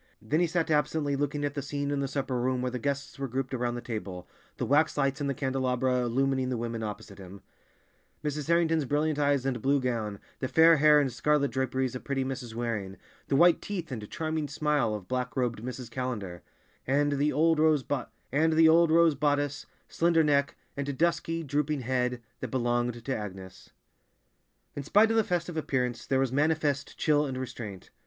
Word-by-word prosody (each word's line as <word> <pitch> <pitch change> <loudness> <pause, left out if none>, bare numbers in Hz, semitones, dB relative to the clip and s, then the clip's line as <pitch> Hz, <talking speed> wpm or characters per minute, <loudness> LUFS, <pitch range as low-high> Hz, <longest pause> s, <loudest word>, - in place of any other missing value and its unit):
Then 155 - 0
he 175 - +3
sat 165 -1 -1
absently 150 -1 +1
looking 145 +1 -1
at 145 - -2
the 145 - -3
scene 140 +1 -3
in 145 - -1
the 140 - -1
supper 135 -2 -2
room 125 0 0
where 125 - -1
the 125 - -4
guests 140 +2 -3
were 135 - -2
grouped 130 +2 -3
around 120 -1 -1
the 120 - -5
table, 95 -7 -6 0.3
the - - -2
wax 150 +3 +2
lights 135 0 0
in 140 - 0
the 140 - -1
candelabra 130 -1 0
illumining 130 +2 0
the 125 - -1
women 115 0 -4
opposite 105 -1 -7
him; 95 0 -11 0.8
Mrs. 150 0 -3
Harrington's 165 -2 +2
brilliant 150 +2 0
eyes 140 -2 +2
and 125 -4 -1
blue 140 +3 +2
gown, 115 -5 -2 0.2
the 130 - -2
fair 160 +3 +6
hair 150 0 +6
and 135 -4 0
scarlet 150 -1 +1
draperies 130 0 -1
of 125 - -6
pretty 135 -1 -1
Mrs. 125 -4 -5
Waring, 105 -5 -3 0.3
the 140 - +1
white 170 +3 +5
teeth 180 -7 -5
and 110 -5 -6
charming 155 -1 -2
smile 145 -5 0
of 100 -3 -8
black 125 0 -3
robed 120 -4 -1
Mrs. 125 -1 -6
Callender, 110 -9 -4 0.5
and 145 +2 +2
the 150 +1 +2
old 160 +2 +3
rose 155 -3 +3
bodice, 160 -2 +2 0.2
slender 165 -1 +2
neck, 140 -2 +2 0.2
and 140 -1 -3
dusky, 165 +1 0
drooping 150 0 -1
head 125 -1 -1 0.2
that 130 - -4
belonged 120 -1 -1
to 135 - -1
Agnes. 95 -3 -8 1.1
In 145 - -3
spite 210 +10 +4
of 225 - +2
the 225 - +4
festive 175 -3 -2
appearance, 125 -5 -2
there 135 -1 +2
was 135 -2 +1
manifest 145 0 0
chill 150 -1 +2
and 130 -1 -4
restraint. 115 -7 -7
135 Hz, 185 wpm, -28 LUFS, 125-150 Hz, 1.1 s, fair